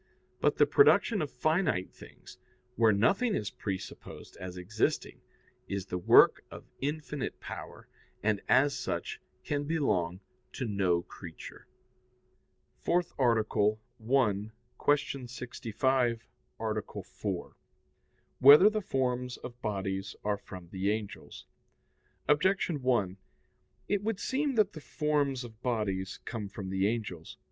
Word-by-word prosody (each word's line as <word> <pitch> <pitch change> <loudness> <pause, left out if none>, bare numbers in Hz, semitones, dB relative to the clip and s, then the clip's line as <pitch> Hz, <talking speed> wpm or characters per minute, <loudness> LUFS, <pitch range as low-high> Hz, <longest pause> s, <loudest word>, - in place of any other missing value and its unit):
But - - +2
the - - +6
production 240 - +5
of 150 - -2
finite 155 - 0
things, - - -14 0.4
where 115 -2 +5
nothing 195 - +2
is 105 -2 -2
presupposed 95 -2 -7
as 90 0 -7
existing, 100 +5 -1 0.5
is 100 -1 -3
the 90 -2 -3
work 90 - +6
of - - -10 0.2
infinite 150 0 -3
power, - - -9 0.4
and, 105 -1 +1
as 140 +1 +4
such, - - -4 0.2
can 145 -1 -2
belong 95 - 0 0.3
to 130 - -3
no 95 -5 +1
creature. 85 -3 -11 1.1
_______________________ - - -34
FOURTH 175 0 +1
ARTICLE 110 -3 +2 0.3
[I, 105 -6 +2 0.3
Q. 140 -3 +1
65, 120 0 -1 0.3
Art. 110 -1 -2 0.2
4] - - -5 0.8
Whether 150 +10 +9
the 215 0 -1
Forms 125 -6 -1
of 120 0 -10
Bodies 95 -2 -3
Are 105 -1 0
from 90 -4 -11
the 95 +2 -1
Angels? 105 -1 -5 0.8
Objection 165 0 +2
1: 105 -7 +1 0.7
It 205 -1 +1
would 215 -1 -2
seem 275 0 -1
that 210 -3 +3
the 155 - -9
forms 145 -2 0
of 115 -1 -12
bodies 105 -6 -2
come 110 -3 -4
from 95 -1 -7
the 95 +1 +2
angels. 105 -8 -4
115 Hz, 125 wpm, -30 LUFS, 100-145 Hz, 1.1 s, Whether